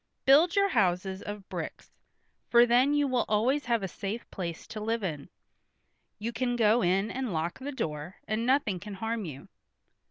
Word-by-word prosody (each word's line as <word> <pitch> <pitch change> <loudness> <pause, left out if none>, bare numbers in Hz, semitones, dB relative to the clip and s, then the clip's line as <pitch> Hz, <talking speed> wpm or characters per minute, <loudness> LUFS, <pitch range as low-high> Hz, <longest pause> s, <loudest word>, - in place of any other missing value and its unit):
Build 310 +6 +6
your 400 0 +4
houses 190 - +1
of 205 -1 -7
bricks, - - -6 0.6
for 240 0 +7
then 250 +4 +4
you 290 -1 +2
will 255 -3 +1
always 250 +7 +2
have 235 -3 +1
a - - -1
safe 200 +5 -5
place 170 -3 -5
to 215 - -7
live 225 +1 -1
in; 150 -6 -4 0.9
you 225 +3 -3
can 245 +1 -1
go 225 0 +4
in 190 +4 +1
and 260 -3 -3
lock 165 +1 -2
the 275 +2 -5
door, 155 - -4
and 215 +1 -1
nothing 245 -7 +2
can 200 +2 -8
harm 225 +1 -3
you." 140 -4 -8
220 Hz, 180 wpm, -29 LUFS, 190-250 Hz, 0.9 s, for